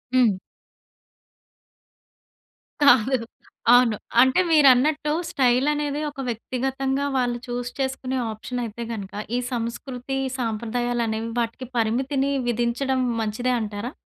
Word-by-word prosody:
హ్మ్. 230 -7 +4 2.5
కాదు. 260 -2 +5 0.6
అవును. 245 -3 +5 0.3
అంటే 260 +7 +4
మీరన్నట్టు 295 0 +4 0.2
స్టైలనేది 285 +2 +1
ఒక 290 -1 -12
వ్యక్తిగతంగా 265 +4 -2
వాళ్ళు 245 -2 +1
చూజ్ 245 0 -3
చేసుకునే 265 -1 -2
ఆప్షనయితే 235 +1 -5
గనక 200 -4 -6 0.2
ఈ - - +1
సంస్కృతి, 245 +2 -4 0.2
సంప్రదాయాలనేవి 230 0 -1
వాటికి 235 +2 -3
పరిమితిని 260 +5 +1 0.2
విధించడం 240 +3 0 0.2
మంచిదే 225 +4 -1
అంటారా? 210 +2 -4
245 Hz, 90 wpm, -24 LUFS, 230-270 Hz, 2.5 s, కాదు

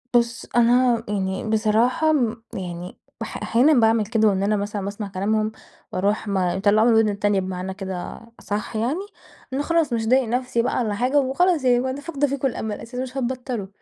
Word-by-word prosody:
بُص 235 0 +1
أنا 240 0 +4
يعني 195 +1 -2
بصراحة 225 +7 +2
امم 240 -7 0
يعني 180 -3 -6 0.2
بح - - -5
أحيانًا 255 +7 +4
باعمل 225 -4 +3
كده 220 0 +2
وإن 195 -2 +1
أنا 210 +1 +2
مثلًا 205 0 -3
باسمع 200 +2 -5
كلامهم 215 +3 -1 0.4
وأروح 205 +3 0
ما 190 -3 0
باطلعه 205 +3 +3
من - - +5
الوِدن 225 -1 +4
التانية 205 -1 +1
بمعنى 185 0 -4
كده 190 -2 -6 0.2
أصح 210 +2 -4
يعني، 240 +10 0 0.5
لأن 265 +2 -1
خلاص 330 -4 +1
مش 230 -1 0
هاضايق 255 +4 +3
نفسي 245 0 0
بقى 245 - -1
والّا 215 -3 -1
حاجة 255 +6 +2
وخلاص 300 +4 +2
يعني 250 0 +3
أنا 270 +2 -5
فاقدة 290 -2 -1
فيكم 275 0 -1
الأمل 220 -4 -4
أساسًا 250 +2 -5
مش 260 +1 -7
هتبطلوا. 250 -4 -3
225 Hz, 180 wpm, -23 LUFS, 205-255 Hz, 0.5 s, من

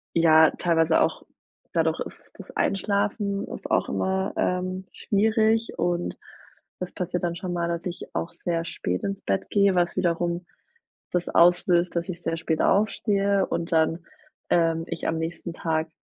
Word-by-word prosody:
ja 160 -1 +6
teilweise 165 -2 +2
auch - - +1 0.5
dadurch, - - +1
ist - - -6 0.2
das - - -12
Einschlafen 200 0 0
ist - - -7
auch - - +2
immer, 190 0 -1
ähm, 185 +1 -1
schwierig 220 +2 +1
und 175 0 -1 0.6
das 180 - -5
passiert 180 0 -3
dann 170 -1 -1
schon 180 0 -4
mal, 170 -1 -1
dass 170 +1 -3
ich 175 -1 -7
auch 170 - -2
sehr 170 -1 0
spät 90 - -3
ins 195 0 -3
Bett 95 0 -1
gehe, 200 -2 +4
was 175 -1 +1
wiederum 175 -1 0 0.7
das 180 -1 -1
auslöst, 175 0 +4
dass 170 +2 -1
ich 175 -1 -5
sehr 165 - -1
spät 160 -1 -1
aufstehe 200 -1 +2
und 170 +1 -3
dann, 165 +1 +2 0.5
ähm, 165 -1 +2
ich 170 - -4
am 160 - 0
nächsten 165 +1 -4
Tag 160 -1 -1
175 Hz, 155 wpm, -25 LUFS, 165-190 Hz, 0.7 s, ja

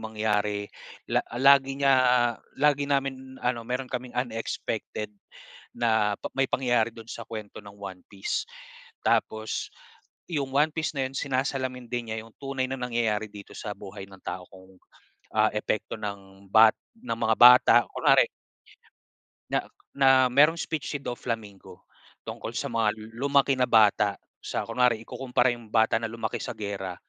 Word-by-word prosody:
mangyari 105 -2 -1 0.4
la - - +2 0.2
lagi 135 0 +5
niya 135 -1 +5 0.6
lagi 145 0 +3
namin, 135 -2 -2
ano 125 -1 0
mayro'n 125 +1 -3
kaming 125 -1 -5
unexpected 115 -3 -3 0.6
na 110 -3 +2
pa - - -4
may 135 - +3
pangyayari 120 -3 +1
do'n 115 -1 -11
sa 115 - -6
kuwento 110 -3 -7
ng 100 - -11
One 95 -2 -8
Piece. 100 -1 -2 0.6
Tapos 110 0 0 0.6
'yong 145 -5 -2
One 150 +3 +3
Piece 160 -1 -2
na 135 - +1
'yon 130 - -14
sinasalamin 130 -2 -2
din 120 -2 -3
niya 110 0 -4
'yong 115 - -18
tunay 135 -1 -2
na 135 - -3
nangyayari 115 -3 -1
dito 100 0 -12
sa 105 - -5
buhay 95 -1 -9
ng 95 -1 -15
tao 90 - -5
kung, 95 0 -17 0.6
ah, 110 0 +4
epekto 110 +1 -2
ng 100 -2 -8
ba 110 0 +9 0.3
ng 245 - -3
mga 110 0 +2
bata. 125 +1 +8 0.2
Kunwari - - +4 1.2
na - - 0 0.3
na 135 -1 +5 0.2
mayro'ng 150 +6 +4
speech 155 -4 -3
si - - -1
Doflamingo 115 -6 -6 0.4
tungkol - - -6
sa - - -3
mga 110 -2 +1
lu 110 +4 -6
lumaki 140 -1 +3
na 125 - +3
bata 105 -3 +4 0.2
sa - - -3
Kunware, 125 -3 +2
ikukumpara 125 +2 0
'yong 120 -3 -8
bata 110 0 +3
na 115 0 -1
lumaki 115 -2 -3
sa - - -5
giyera 100 -3 -5
115 Hz, 155 wpm, -27 LUFS, 105-130 Hz, 1.2 s, ba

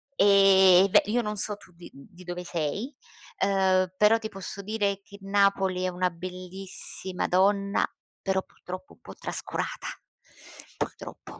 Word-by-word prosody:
e 195 -3 +6
beh, - - +6
io 235 +4 +1
non 210 -1 -3
so 205 +1 0
tu 190 - -16
di 170 0 -13
di 175 +6 -15
dove 175 0 -6
sei, 175 - -3 0.5
uhm, 190 -2 +2
però 210 +3 +5
ti 220 -1 -6
posso 195 -1 -7
dire 200 -1 -1
che 200 - -14
Napoli 195 -2 +2
è 185 - +1
una 180 0 0
bellissima 185 +1 -4
donna, 200 +2 +2 0.4
però 190 -1 0
purtroppo 185 +10 -10
un - - -24
po' - - -11
trascurata, - - -4 0.9
purtroppo. - - -7
195 Hz, 140 wpm, -27 LUFS, 185-200 Hz, 0.9 s, e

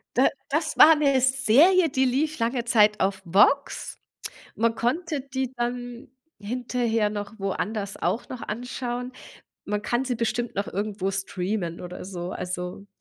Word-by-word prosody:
Da 260 - +5 0.2
das 310 +2 -1
war 320 +1 +9
'ne 280 -3 +3
Serie, 270 - +5
die 265 -2 +1
lief 300 +4 0
lange 235 +1 0
Zeit 210 -3 +4
auf 190 0 0
VOX. 205 +11 +2 0.6
Man 230 0 +1
konnte 300 +6 -1
die 265 -1 -4
dann 245 0 -4 0.3
hinterher 230 0 -1
noch 205 +1 -5
woanders 200 +1 -3
auch 235 - -1
noch 255 - -7
anschauen. 245 +2 -4 0.5
Man 210 0 -2
kann 240 +4 0
sie 255 -2 -1
bestimmt 235 +1 -2
noch 200 0 -2
irgendwo 200 -1 -2
streamen 190 -2 -3
oder 180 0 -8
so. 180 -1 -5
Also, 180 +2 -5
235 Hz, 145 wpm, -25 LUFS, 205-260 Hz, 0.6 s, war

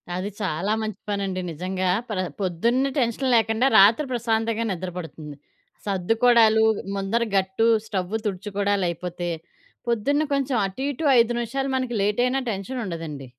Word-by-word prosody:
అది 185 +3 -3
చాలా 190 +1 -1
మంచి 215 -2 -4
పనండి. 195 -2 -2
నిజంగా 185 +3 -2 0.2
ప్ర 210 - -3 0.2
పొద్దున్నే 235 +9 +1
టెన్షన్ 245 +2 0
లేకుండా 225 +3 +3
రాత్రి 220 +9 +6
ప్రశాంతంగా 230 -1 0
నిద్ర 185 0 -4
పడుతుంది. 155 -3 -8 0.5
సద్దుకోడాలు, 220 +3 +4 0.3
ముందర 195 +4 0
గట్టు, 190 +4 +1 0.2
స్టవు 190 -1 -3
తుడుచుకోడాలైపోతే 190 -3 -2 0.6
పొద్దున్న 240 +6 +1
కొంచేం 275 -3 0
అటు 195 +8 -6
ఇటు 285 +3 -4
ఐదు 235 +1 +3
నిమిషాలు 270 +4 -2
మనకి 255 -2 -2
లేటైనా 245 +6 +1
టెన్షనుండదండి. 185 - -5
210 Hz, 120 wpm, -24 LUFS, 185-235 Hz, 0.6 s, రాత్రి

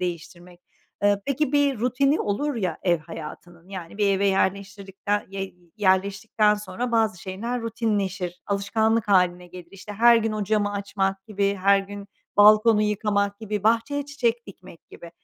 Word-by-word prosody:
değiştirmek. 175 0 -6 0.4
Eee, 205 0 +3
peki 280 0 -1
bir 285 -4 +2
rutini 265 +5 +1
olur 285 +9 -1
ya 185 -8 -2
ev 175 -2 +2
hayatının 165 +3 -10
yani 185 0 -8
bir 205 - +2
eve 195 0 +2
yerleştirdikten 200 +1 -1
y 195 0 -6 0.2
yerleştikten 200 +2 +2
sonra 210 +4 -5
bazı 220 -5 +1
şeyler 230 +6 -4
rutinleşir, 200 -5 -2
alışkanlık 220 +2 0
hâline 180 -2 +2
gelir. 175 -1 -12
İşte, 195 +2 -10
her 235 +3 +5
gün 225 -1 0
o 215 -1 -2
camı 205 0 0
açmak 195 -1 -2
gibi, 200 -2 -1
her 200 0 +5
gün 200 +1 -8 0.3
balkonu 215 +1 +6
yıkamak 205 -1 0
gibi, 210 -2 -4
bahçeye 230 +6 +1
çiçek 240 -4 -1
dikmek 185 -4 -14
gibi. 170 - -12
200 Hz, 150 wpm, -24 LUFS, 190-225 Hz, 0.4 s, balkonu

